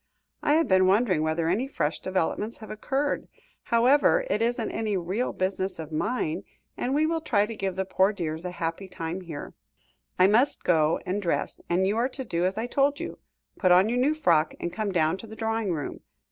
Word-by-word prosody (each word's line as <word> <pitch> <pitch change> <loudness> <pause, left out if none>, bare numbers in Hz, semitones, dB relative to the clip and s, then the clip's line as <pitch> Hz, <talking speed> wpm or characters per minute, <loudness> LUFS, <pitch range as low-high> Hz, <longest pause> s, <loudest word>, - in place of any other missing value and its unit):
I 295 - +2
have 325 +1 +3
been 185 -1 +4
wondering 190 -4 +3
whether 160 +1 0
any 210 +10 +1
fresh 155 - -2
developments 190 +4 -2
have 220 - -10
occurred. 270 +7 -2 0.4
However, 270 - +4
it 210 - +1
isn't 230 -1 0
any 215 -3 -1
real 185 +8 -1
business 190 0 -2
of 160 -1 -7
mine, 175 0 -1 0.3
and 260 +3 -1
we 305 +1 +3
will 325 0 0
try 210 -9 +2
to 225 +1 -7
give 195 -3 -2
the 190 0 -1
poor 190 +1 +3
dears 165 -5 -4
a 180 - -3
happy 170 +2 -4
time 180 0 -5
here. 160 -5 -8 0.6
I 185 - +6
must 230 +8 +3
go 160 -2 +3
and 195 +3 -1
dress, 175 - -2
and 180 +2 +2
you 205 +3 +1
are 245 +3 +1
to 265 0 -6
do 170 -4 0
as 190 +2 -1
I 225 - -1
told 280 +3 +1
you; - - -6 0.4
put 185 -2 +3
on 185 +4 +6
your 245 +2 0
new 290 +5 +2
frock, 165 - +2
and 175 - -4
come 215 0 -2
down 165 -1 +2
to 225 - -10
the 220 - -10
drawing 225 -3 -1
room. 150 -4 -4
195 Hz, 210 wpm, -26 LUFS, 175-235 Hz, 0.6 s, I